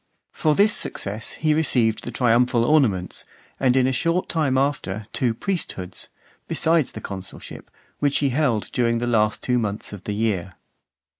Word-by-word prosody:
For 155 Hz, -1 st, +1 dB
this 210 Hz, +4 st, +4 dB
success 105 Hz, +2 st, -2 dB
he 155 Hz, -1 st, +1 dB
received 125 Hz, -8 st, +2 dB
the -, -, -4 dB
triumphal 120 Hz, 0 st, +2 dB
ornaments, 115 Hz, -12 st, +1 dB, 0.4 s
and 130 Hz, -1 st, +3 dB
in 130 Hz, -1 st, +4 dB
a 130 Hz, -, +2 dB
short 165 Hz, +8 st, 0 dB
time 145 Hz, -6 st, +1 dB
after 120 Hz, -7 st, -1 dB
two 120 Hz, -3 st, 0 dB
priesthoods, 110 Hz, -, -4 dB, 0.4 s
besides 160 Hz, -3 st, +2 dB
the -, -, -7 dB
consulship, 95 Hz, -1 st, -8 dB, 0.3 s
which 145 Hz, -1 st, +2 dB
he 140 Hz, -, +1 dB
held 125 Hz, -5 st, 0 dB
during 115 Hz, -1 st, +1 dB
the 120 Hz, -, -1 dB
two 120 Hz, -, -1 dB
last 105 Hz, -2 st, +1 dB
months 110 Hz, -5 st, -1 dB
of 100 Hz, -2 st, -10 dB
the 105 Hz, -, -2 dB
year. 100 Hz, -4 st, -1 dB
120 Hz, 160 wpm, -23 LUFS, 105-145 Hz, 0.4 s, this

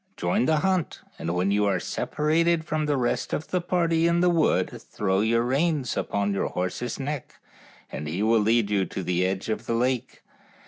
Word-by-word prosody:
Join 210 Hz, +5 st, +1 dB
the 155 Hz, -1 st, +2 dB
hunt, 185 Hz, -6 st, 0 dB, 0.2 s
and 85 Hz, +1 st, -2 dB
when 90 Hz, +3 st, +1 dB
you 105 Hz, +1 st, +2 dB
are 95 Hz, -2 st, +1 dB
separated 160 Hz, -, 0 dB
from 155 Hz, -1 st, -1 dB
the 145 Hz, -1 st, +1 dB
rest 120 Hz, -2 st, -1 dB
of 155 Hz, -, -3 dB
the 180 Hz, -, 0 dB
party 170 Hz, -2 st, +1 dB
in 170 Hz, 0 st, +2 dB
the 180 Hz, 0 st, +4 dB
wood 165 Hz, -3 st, +1 dB
throw 95 Hz, -2 st, -1 dB
your 115 Hz, +2 st, +2 dB
reins 140 Hz, +1 st, 0 dB
upon 100 Hz, 0 st, -1 dB
your 100 Hz, -, 0 dB
horse's 95 Hz, +8 st, -3 dB
neck 140 Hz, 0 st, -5 dB, 0.6 s
and 75 Hz, +2 st, -5 dB
he 85 Hz, +7 st, -2 dB
will 115 Hz, +1 st, +4 dB
lead 110 Hz, 0 st, +2 dB
you 100 Hz, -2 st, +2 dB
to 95 Hz, -, -5 dB
the 90 Hz, 0 st, 0 dB
edge 95 Hz, +1 st, -1 dB
of 110 Hz, -, -3 dB
the 115 Hz, -, 0 dB
lake. 125 Hz, +1 st, -1 dB
120 Hz, 195 wpm, -25 LUFS, 100-160 Hz, 0.6 s, the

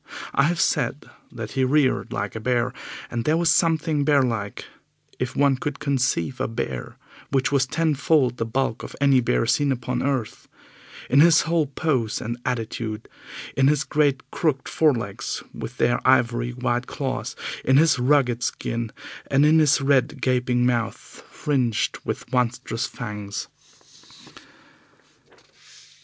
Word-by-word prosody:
I 140 Hz, -, +3 dB
have 170 Hz, +2 st, 0 dB
said 145 Hz, -2 st, 0 dB, 0.2 s
that 110 Hz, -3 st, -7 dB
he 135 Hz, -, 0 dB
reared 135 Hz, 0 st, +2 dB
like 100 Hz, +1 st, -3 dB
a -, -, -3 dB
bear, 125 Hz, +1 st, 0 dB, 0.4 s
and 120 Hz, -1 st, -2 dB
there 155 Hz, +5 st, +2 dB
was 170 Hz, -1 st, +3 dB
something 160 Hz, -3 st, +1 dB
bear 140 Hz, -2 st, +4 dB
like 110 Hz, -5 st, -3 dB, 0.5 s
if 125 Hz, -1 st, -3 dB
one 140 Hz, -2 st, +3 dB
could 145 Hz, +1 st, -4 dB
conceive 130 Hz, -, -1 dB
a -, -, 0 dB
bear 65 Hz, -, -5 dB, 0.3 s
which 135 Hz, 0 st, +1 dB
was 135 Hz, -2 st, +2 dB
ten 160 Hz, +2 st, +1 dB
fold 135 Hz, -3 st, +2 dB
the 115 Hz, -, -1 dB
bulk 120 Hz, 0 st, -1 dB
of -, -, -8 dB
any 140 Hz, -2 st, +4 dB
bear 115 Hz, -, +1 dB
seen 140 Hz, +4 st, +2 dB
upon 125 Hz, -1 st, -2 dB
earth 130 Hz, -5 st, -2 dB, 0.6 s
in 140 Hz, -, +4 dB
his 165 Hz, +1 st, +7 dB
whole 165 Hz, -2 st, +1 dB
pose 130 Hz, -5 st, -1 dB
and 115 Hz, +1 st, -4 dB
attitude, 115 Hz, -2 st, -3 dB, 0.5 s
in 135 Hz, 0 st, +4 dB
his 150 Hz, 0 st, +2 dB
great 145 Hz, -3 st, 0 dB
crooked 150 Hz, -5 st, -1 dB
forelegs 120 Hz, -11 st, 0 dB
with 125 Hz, -, -7 dB
their 120 Hz, -, +2 dB
ivory 120 Hz, -2 st, +3 dB
white 120 Hz, 0 st, -2 dB
claws, 135 Hz, -2 st, -4 dB, 0.3 s
in 130 Hz, +1 st, +4 dB
his 155 Hz, -3 st, +4 dB
rugged 125 Hz, -2 st, +2 dB
skin, 115 Hz, -1 st, -3 dB, 0.4 s
and 140 Hz, +2 st, +4 dB
in 155 Hz, +1 st, +5 dB
his 150 Hz, -2 st, +4 dB
red, 135 Hz, 0 st, +2 dB
gaping 125 Hz, -1 st, +1 dB
mouth, 115 Hz, -2 st, 0 dB, 0.3 s
fringed 125 Hz, -7 st, -1 dB
with -, -, -5 dB
monstrous 125 Hz, -1 st, -1 dB
fangs. 105 Hz, -3 st, -6 dB
130 Hz, 145 wpm, -23 LUFS, 120-145 Hz, 0.6 s, his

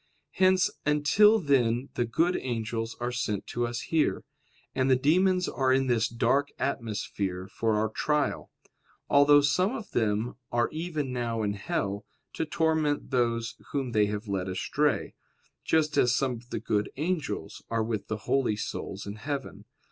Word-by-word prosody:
Hence 185 Hz, 0 st, +3 dB
until 150 Hz, +9 st, +5 dB
then 130 Hz, -, +1 dB
the 120 Hz, -, 0 dB
good 165 Hz, +10 st, +1 dB
angels 115 Hz, -2 st, -3 dB
are 120 Hz, +1 st, -2 dB
sent 105 Hz, -4 st, -2 dB
to 120 Hz, 0 st, -2 dB
us 120 Hz, 0 st, -4 dB
here; 160 Hz, -2 st, 0 dB, 0.5 s
and 130 Hz, 0 st, +1 dB
the 130 Hz, -, +6 dB
demons 180 Hz, +7 st, +3 dB
are 130 Hz, -1 st, +1 dB
in 135 Hz, +1 st, +3 dB
this 120 Hz, -2 st, +2 dB
dark 120 Hz, +5 st, +1 dB
atmosphere 100 Hz, -7 st, -3 dB
for 110 Hz, +2 st, 0 dB
our 110 Hz, +1 st, +2 dB
trial: 150 Hz, +7 st, -1 dB, 0.6 s
although 145 Hz, +1 st, +7 dB
some 180 Hz, -, +2 dB
of 220 Hz, -, -7 dB
them 110 Hz, +2 st, 0 dB
are 120 Hz, 0 st, +1 dB
even 155 Hz, -5 st, -3 dB
now 115 Hz, -2 st, -2 dB
in 100 Hz, -1 st, 0 dB
hell, 100 Hz, 0 st, -2 dB, 0.3 s
to -, -, -2 dB
torment 155 Hz, -2 st, 0 dB
those 115 Hz, -2 st, 0 dB, 0.2 s
whom 135 Hz, -3 st, -1 dB
they 105 Hz, -2 st, +3 dB
have 105 Hz, +1 st, -4 dB
led 95 Hz, -2 st, -2 dB
astray; 95 Hz, 0 st, 0 dB, 0.5 s
just 155 Hz, -2 st, +1 dB
as 125 Hz, 0 st, +4 dB
some 135 Hz, -2 st, +1 dB
of 120 Hz, 0 st, -8 dB
the -, -, -3 dB
good 105 Hz, -2 st, -1 dB
angels 160 Hz, 0 st, -3 dB
are 115 Hz, -1 st, 0 dB
with 110 Hz, -2 st, -3 dB
the 110 Hz, -, -2 dB
holy 130 Hz, -6 st, +2 dB
souls 100 Hz, -1 st, -5 dB
in 100 Hz, +1 st, -6 dB
heaven. 140 Hz, +4 st, -5 dB
125 Hz, 160 wpm, -28 LUFS, 110-150 Hz, 0.6 s, although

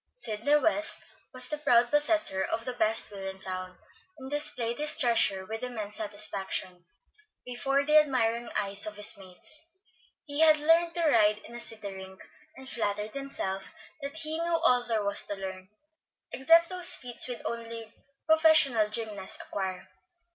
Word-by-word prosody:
Sidney 275 Hz, -, -1 dB
West 310 Hz, +1 st, +2 dB, 0.3 s
was 255 Hz, -1 st, +3 dB
the 300 Hz, +3 st, -4 dB
proud 240 Hz, -4 st, +2 dB
possessor 295 Hz, -, +2 dB
of 225 Hz, +4 st, -4 dB
the 255 Hz, -, -5 dB
best 220 Hz, -2 st, +4 dB
wheel 195 Hz, -1 st, -8 dB
in 190 Hz, 0 st, -11 dB
town, 185 Hz, -1 st, -5 dB, 0.4 s
and 265 Hz, -1 st, -11 dB
displayed 250 Hz, -5 st, +2 dB
his 300 Hz, 0 st, +4 dB
treasure 225 Hz, -6 st, +1 dB
with 220 Hz, +2 st, -7 dB
immense 220 Hz, -5 st, -5 dB
satisfaction 195 Hz, -4 st, -3 dB, 0.6 s
before 275 Hz, +3 st, -2 dB
the 305 Hz, +1 st, +5 dB
admiring 240 Hz, -5 st, -1 dB
eyes 200 Hz, 0 st, +1 dB
of 210 Hz, -, -6 dB
his 210 Hz, +1 st, +4 dB
mates. 190 Hz, -, -7 dB, 0.6 s
He 290 Hz, -1 st, -5 dB
had 315 Hz, -1 st, +6 dB
learned 330 Hz, +3 st, +2 dB
to 340 Hz, -2 st, 0 dB
ride 215 Hz, -6 st, +3 dB
in -, -, -14 dB
a 240 Hz, -, -7 dB
city 215 Hz, -4 st, -5 dB
rink, 190 Hz, 0 st, -12 dB, 0.3 s
and 265 Hz, 0 st, -12 dB
flattered 210 Hz, -3 st, -4 dB
himself 195 Hz, -9 st, -4 dB, 0.3 s
that 280 Hz, +3 st, -6 dB
he 315 Hz, 0 st, -1 dB
knew 335 Hz, 0 st, 0 dB
all 245 Hz, -1 st, +3 dB
there 220 Hz, -3 st, -1 dB
was 200 Hz, 0 st, +3 dB
to 205 Hz, -, -4 dB
learn, 190 Hz, -1 st, -9 dB, 0.6 s
except 330 Hz, +5 st, +3 dB
those 365 Hz, -1 st, +6 dB
feats 245 Hz, -2 st, +1 dB
which 245 Hz, -1 st, -6 dB
only 230 Hz, -1 st, -7 dB, 0.3 s
professional 315 Hz, -9 st, +4 dB
gymnasts 215 Hz, -3 st, -3 dB
acquire. 190 Hz, -2 st, -6 dB
235 Hz, 160 wpm, -27 LUFS, 205-295 Hz, 0.6 s, had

